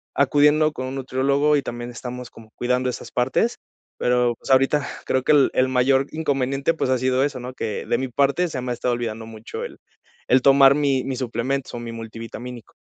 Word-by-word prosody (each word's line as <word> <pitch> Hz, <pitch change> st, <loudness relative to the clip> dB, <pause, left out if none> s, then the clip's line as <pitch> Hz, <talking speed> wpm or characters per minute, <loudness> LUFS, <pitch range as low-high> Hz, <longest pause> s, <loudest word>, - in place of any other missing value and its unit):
acudiendo 150 Hz, +2 st, +4 dB
con 130 Hz, -3 st, -5 dB
un 130 Hz, -, -5 dB
nutriólogo, 140 Hz, +3 st, +1 dB
y -, -, 0 dB
también 120 Hz, -1 st, -6 dB
estamos 125 Hz, +1 st, -7 dB
como 110 Hz, -1 st, -15 dB
cuidando 125 Hz, +1 st, 0 dB
esas 125 Hz, -, -7 dB
partes, 130 Hz, -, 0 dB, 0.4 s
pero 125 Hz, -1 st, +2 dB
pues -, -, -11 dB
ahorita 135 Hz, +2 st, +3 dB, 0.2 s
creo 130 Hz, -1 st, 0 dB
que -, -, +3 dB
el 145 Hz, -2 st, +4 dB
el 130 Hz, -, +3 dB
mayor 130 Hz, +1 st, +2 dB
inconveniente 140 Hz, -1 st, 0 dB
pues 160 Hz, -, -2 dB
ha 130 Hz, -, +3 dB
sido 130 Hz, +1 st, +1 dB
eso, 140 Hz, -3 st, -4 dB
¿no?, 125 Hz, +1 st, -7 dB
que 110 Hz, -4 st, -4 dB
de 120 Hz, -, +1 dB
mi 130 Hz, -, -2 dB
parte 140 Hz, +8 st, +1 dB
se 130 Hz, -6 st, -4 dB
me 125 Hz, 0 st, -3 dB
ha -, -, +1 dB
estado 120 Hz, +1 st, -1 dB
olvidando 115 Hz, -2 st, -4 dB
mucho 110 Hz, 0 st, -8 dB
el -, -, -10 dB, 0.5 s
el 130 Hz, +1 st, +4 dB
tomar 135 Hz, 0 st, +7 dB
mi 140 Hz, -3 st, +1 dB
mi 135 Hz, -, -2 dB
suplemento 125 Hz, +2 st, -3 dB
o -, -, -5 dB
mi 120 Hz, -1 st, -6 dB
multivitamínico. 115 Hz, +1 st, -8 dB
130 Hz, 205 wpm, -22 LUFS, 120-140 Hz, 0.5 s, tomar